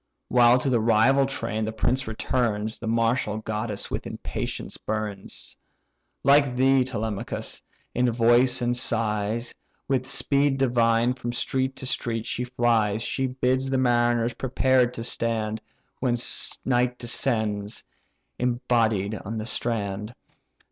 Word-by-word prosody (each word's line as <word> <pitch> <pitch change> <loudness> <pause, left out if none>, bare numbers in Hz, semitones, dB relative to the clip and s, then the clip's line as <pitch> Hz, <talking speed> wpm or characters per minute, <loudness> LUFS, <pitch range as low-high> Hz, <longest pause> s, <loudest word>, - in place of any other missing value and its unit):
While 120 0 +6
to 130 +2 0
the 120 - +3
rival 120 +5 +4
train 115 -4 -2
the 110 - -2
prince 125 +3 -1
returns, 110 -1 -1
The 115 - -5
martial 115 -1 +1
goddess 110 -1 -3
with - - -3
impatience - - -5
burns; 105 -2 -5 0.7
Like 140 -2 +4
thee, 130 +1 +4
Telemachus, 110 -5 -3 0.3
in 125 0 +2
voice 120 +2 +4
and 120 0 +1
size, 110 0 -1 0.3
With 130 -2 0
speed 140 0 +2
divine 120 -2 +3
from 120 -1 -5
street 130 +2 -1
to - - -6
street 115 -3 -1
she 125 - -2
flies, 115 -3 +1
She 135 +2 -1
bids 130 +1 0
the 135 - +1
mariners 120 -2 +2
prepared 130 0 +2
to 115 - -4
stand, 110 -2 -2 0.4
When 125 -2 +1 0.5
night 125 -1 +1
descends, 110 -4 -2 0.6
embodied 115 -4 +1
on 110 +3 -5
the 110 - -4
strand. 105 -2 -2
120 Hz, 125 wpm, -25 LUFS, 110-125 Hz, 0.7 s, While